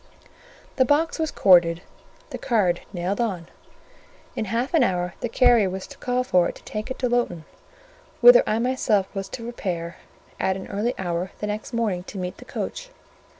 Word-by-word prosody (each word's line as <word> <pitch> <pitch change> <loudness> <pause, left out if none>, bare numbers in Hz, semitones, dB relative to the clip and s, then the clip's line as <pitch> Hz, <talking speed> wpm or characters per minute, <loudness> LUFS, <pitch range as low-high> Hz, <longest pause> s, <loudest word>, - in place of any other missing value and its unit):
The 260 - +5
box 300 +6 +1
was 320 -1 0
corded, 175 - +4 0.5
the - - -5
card 195 -8 +1
nailed 190 +4 -2
on. 185 -8 -2 0.9
In 220 - -2
half 230 - -2
an 320 -6 +5
hour 180 -4 0
the 240 - -3
carrier 235 -5 +4
was 190 +1 -5
to - - -13
call 250 0 0
for 180 -8 +2
it - - -8
to - - -15
take 215 +2 -5
it 260 - -4
to 250 - 0
Lowton, 235 -10 -1 0.7
whither - - +9
I 215 - +1
myself 230 -5 0
was 195 -1 -5
to 230 - -7
repair 175 -7 -4 0.4
at 190 0 0
an 190 - -7
early 215 +5 -1
hour 175 0 -2
the - - -4
next 210 +2 -4
morning 220 -7 -1
to 200 - -9
meet 180 -1 -4
the - - -13
coach. - - -5
210 Hz, 185 wpm, -24 LUFS, 180-245 Hz, 0.9 s, whither